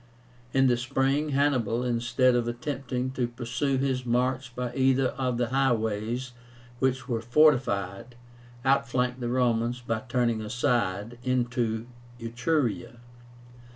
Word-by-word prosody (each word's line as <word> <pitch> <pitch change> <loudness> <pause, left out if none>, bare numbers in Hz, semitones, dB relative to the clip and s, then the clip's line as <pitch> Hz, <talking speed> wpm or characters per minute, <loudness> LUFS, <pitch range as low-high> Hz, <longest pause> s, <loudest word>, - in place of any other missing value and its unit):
In 135 +1 +3
the 125 -2 +3
spring, 135 +4 0
Hannibal, 130 -5 +1
instead 125 +1 +2
of 120 -1 +1
attempting 125 +1 -3
to 130 -2 -1
pursue 125 +3 -2
his 130 -1 0
march 125 +1 0
by 125 -1 -3
either 130 0 +3
of 125 -2 -2
the 120 -1 0
highways 120 -1 0 0.5
which 130 0 0
were 115 -3 -1
fortified, 120 -5 +2 0.5
outflanked 125 -1 +1
the 120 -1 -2
Romans 120 -1 +1
by 115 -2 -2
turning 120 -3 +1
aside 115 -1 -1
into 120 -3 0 0.3
Etruria. 120 0 -1
125 Hz, 120 wpm, -27 LUFS, 120-130 Hz, 0.5 s, In